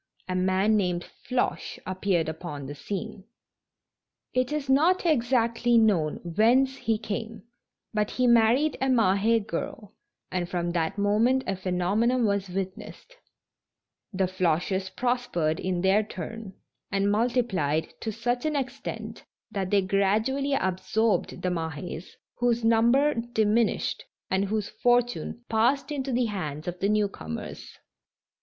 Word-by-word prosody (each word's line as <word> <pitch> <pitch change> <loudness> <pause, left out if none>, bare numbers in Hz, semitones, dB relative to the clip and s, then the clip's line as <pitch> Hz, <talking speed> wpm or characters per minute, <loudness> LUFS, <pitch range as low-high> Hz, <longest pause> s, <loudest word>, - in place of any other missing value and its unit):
a 185 - -2
man 190 +3 +2
named 180 -4 0 0.3
Floche 250 -1 -1
appeared 185 -3 0
upon 160 -3 -6
the 145 - -6
scene. 200 +6 -6 1.1
It 255 +2 +1
is 300 -2 -2
not 320 +8 +3
exactly 240 -5 +2
known 190 -9 +3
whence 235 +10 +3
he 225 -4 0
came, 220 0 -5 0.5
but 210 -1 0
he 255 - 0
married 235 +5 +4
a 265 - +2
Mahd 225 -1 +3
girl, 210 -1 -5 0.4
and 175 -1 -2
from 175 -1 -1
that 165 +1 -1
moment 220 +6 +2
a 195 - -1
phenomenon 195 +7 +1
was 200 -2 0
witnessed 190 - -6 0.5
— - - -62
the 195 -2 0
Floches 185 +1 0
prospered 240 -11 0
in 185 -1 -1
their 190 +3 +4
turn, 210 0 -7 0.4
and 200 0 +1
mul 225 +4 +2
tiplied 185 - 0
to 220 - -3
such 240 +3 -2
an 310 -1 0
extent 270 -1 -5 0.3
that 195 -4 -2
they 200 -1 +3
gradually 215 +9 +1
absorbed 200 -1 0
the 180 - +1
Mahes, 165 0 -5 0.2
whose 240 -1 +1
number 235 +6 +4
diminished, 230 -1 0 0.3
and 190 +1 +2
whose 210 0 -1
fortune 245 0 +1
passed 240 +7 +1
into 275 -2 -2
the 245 0 +2
hands 155 -8 -4
of 175 0 -4
the 200 - +1
new 210 -1 +3
comers. 80 - -8
210 Hz, 135 wpm, -27 LUFS, 185-240 Hz, 1.1 s, married